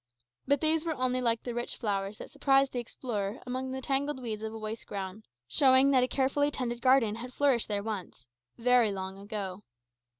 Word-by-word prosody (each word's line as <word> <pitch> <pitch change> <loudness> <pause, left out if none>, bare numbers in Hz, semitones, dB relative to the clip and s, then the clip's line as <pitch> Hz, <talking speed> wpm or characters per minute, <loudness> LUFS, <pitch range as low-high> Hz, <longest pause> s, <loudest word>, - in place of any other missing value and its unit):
But 285 0 +3
these 315 0 +3
were 325 -2 -2
only 255 -1 0
like 230 -2 +1
the 245 - -4
rich 240 +1 -3
flowers 200 -2 -2
that - - -9
surprise 275 -1 +3
the 245 - -2
explorer 220 -3 -4
amidst 255 +1 -3
the 265 0 -5
tangled 275 +1 0
weeds 220 -4 -4
of 220 0 -4
a 225 - -7
waste 220 +1 -6
ground, 195 +1 -6 0.2
showing 265 - +5
that 260 -2 +5
a 250 - +2
carefully 275 +2 +1
tended 240 -4 -3
garden 255 -4 +4
has 250 +2 -8
flourished 275 -5 +2
there 205 -1 -2
once 195 - -5 0.3
very 245 -2 +4
long 190 0 -5
ago. 200 -2 -5
245 Hz, 195 wpm, -30 LUFS, 210-265 Hz, 0.3 s, showing